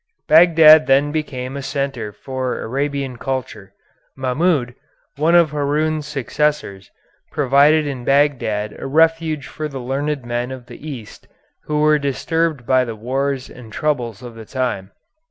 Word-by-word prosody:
Bagdad 160 -1 +7
then 140 +2 +3
became 135 -4 -4
a 140 - -4
centre 135 -6 -3
for 130 +4 -4
Arabian 140 0 -3
culture. 115 -6 -5 0.4
Mahmoud, 130 0 0 0.4
one 160 +4 +2
of 170 -4 +5
Haroun's 150 +1 -1
successors, 145 -7 -2 0.4
provided 145 +2 +4
in 135 -4 -5
Bagdad 125 -7 +1
a - - -5
refuge 160 0 +2
for 155 +3 -5
the 140 -2 -8
learned 135 +2 -3
men 120 +1 -2
of 130 -2 -8
the 125 +6 -10
East 120 -7 -10 0.4
who 150 0 -1
were 150 0 +4
disturbed 150 0 -1
by 130 +1 +3
the 115 -3 -5
wars 130 +4 -2
and 120 -3 -13
troubles 125 -5 -2
of 120 -1 -9
the 115 -1 -11
time. 125 -7 -3
140 Hz, 140 wpm, -19 LUFS, 125-150 Hz, 0.4 s, Bagdad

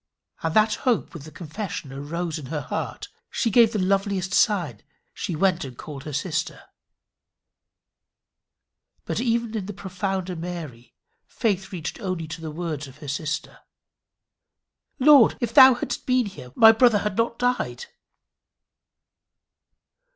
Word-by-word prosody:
And 165 -1 -2
that 215 0 +4
hope 250 -4 0
with 150 -4 -9
the 155 - -11
confession 165 -4 -6
arose 160 +4 -4
in 140 - -9
her 150 +1 -3
heart, - - -5 0.2
she 230 - -1
gave 230 0 +6
the 220 - -2
loveliest 195 -1 0
sign: 170 - +2 0.3
she 170 - -4
went 180 +1 +1
and 130 -3 -9
called 145 -3 -9
her 155 - -5
sister. 155 +3 -3 2.4
But - - -2
even 235 -2 0
in 200 -3 -3
the 205 - -5
profounder 190 -1 -3
Mary 165 -8 -7 0.3
faith 200 -4 -1
reached 175 -4 -5
only 185 -4 -3
to 165 - -7
the 160 - -5
words 155 -3 -4
of 135 +1 -14
her 150 -1 -11
sister: 150 +3 -4 1.4
"Lord, 275 -3 +6
if 235 -2 -2
thou 265 -2 +9
hadst - - -5
been 255 -1 +3
here, 190 -11 -9
my 220 0 +9
brother 225 -1 +4
had 210 -2 -1
not 230 +1 0
died." 250 - -1
185 Hz, 140 wpm, -24 LUFS, 155-220 Hz, 2.4 s, thou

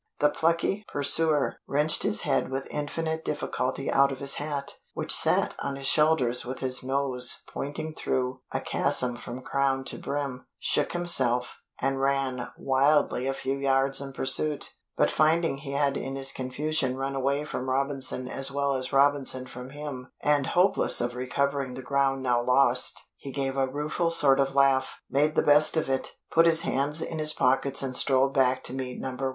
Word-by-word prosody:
The 150 0 +3
plucky 170 +6 0
pursuer 145 +1 +1
wrenched 150 +3 +3
his - - +2
head 65 - 0
with 135 +1 -4
infinite 160 +2 -3
difficulty 135 -2 -3
out 140 0 +4
of 135 - -5
his 140 +1 -2
hat, 145 -2 -4 0.2
which - - +2
sat - - +3
on 140 - -3
his 135 0 -7
shoulders 150 -5 +3
with 130 +2 -6
his 130 -1 -1
nose 130 -2 -1
pointing 150 +3 -5
through 130 -3 -2
a - - -2
chasm 125 -1 +1
from 120 +1 -8
crown 135 -1 0
to - - -2
brim, 140 -3 -4
shook 150 - 0
himself, 130 -9 +1 0.2
and 135 0 -1
ran 135 -2 -1
wildly 135 -1 +1
a 135 - 0
few 135 0 -2
yards 135 0 +2
in 140 -1 -6
pursuit 135 +2 +1 0.3
but - - +2
finding 155 -1 +2
he 140 -1 -7
had 140 0 +1
in 135 0 -4
his 135 0 -2
confusion 130 0 -2
run 135 +1 -3
away 140 +2 -1
from 130 -3 -5
Robinson 135 -1 -1
as 135 +1 +3
well 140 0 -1
as 130 -1 -3
Robinson 135 -2 +2
from 125 0 -10
him, 140 -3 -8
and 145 -2 +2
hopeless 185 +2 +3
of 120 0 -1
recovering 130 +1 -2
the 130 - -8
ground 135 0 0
now 120 -2 +1
lost, 125 0 +2
he 135 - -9
gave 135 0 -2
a 135 -1 +1
rueful 150 +5 -2
sort 145 -5 +5
of 135 0 0
laugh, 135 -1 +2
made 150 +3 +1
the - - +2
best 150 +2 +4
of 160 - 0
it, 135 -1 -2 0.2
put 165 +1 +5
his 165 0 +5
hands 150 0 -1
in 160 - -5
his 155 0 +2
pockets 135 +1 +1
and 130 -1 -3
strolled 135 +1 +3
back 130 -1 +2
to - - -3
meet 130 -1 -5
No. 135 - -4
1. 125 - -9
135 Hz, 180 wpm, -26 LUFS, 130-145 Hz, 0.3 s, sort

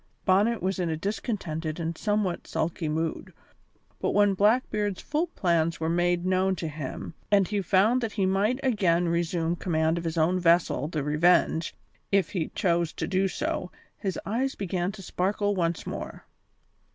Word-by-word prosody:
Bonnet 205 +3 +3
was 190 0 -1
in 175 -2 0
a 160 - -1
discontented 170 -5 -3
and 165 0 -2
somewhat 205 -2 -1
sulky 160 -1 -2
mood, 160 +1 -2 0.7
but - - -1
when 205 -1 +5
Blackbeard's 210 -1 +1
full 310 +4 -1
plans 170 - 0
were 160 0 -1
made 175 0 +1
known 185 +1 +2
to 170 - -4
him 150 0 -6 0.2
and 200 -3 +4
he 205 -1 -1
found 205 +7 +3
that 230 -2 -3
he 200 -3 +1
might 200 +7 +1
again 180 -9 +2
resume 170 0 0
command 160 -1 0
of - - -7
his 165 0 -3
own 170 +3 +2
vessel, 170 -5 +3
the 155 -3 -3
Revenge, 160 +2 +2 0.4
if 195 -1 +3
he 170 -5 -1
chose 170 -4 +1
to 160 - -3
do 190 +3 +1
so, 180 -1 -3 0.2
his 190 -2 -3
eyes 255 +6 -1
began 185 -1 -2
to 195 -2 -10
sparkle 205 +3 0
once 170 -3 -1
more. - - -6
180 Hz, 165 wpm, -27 LUFS, 165-200 Hz, 0.7 s, when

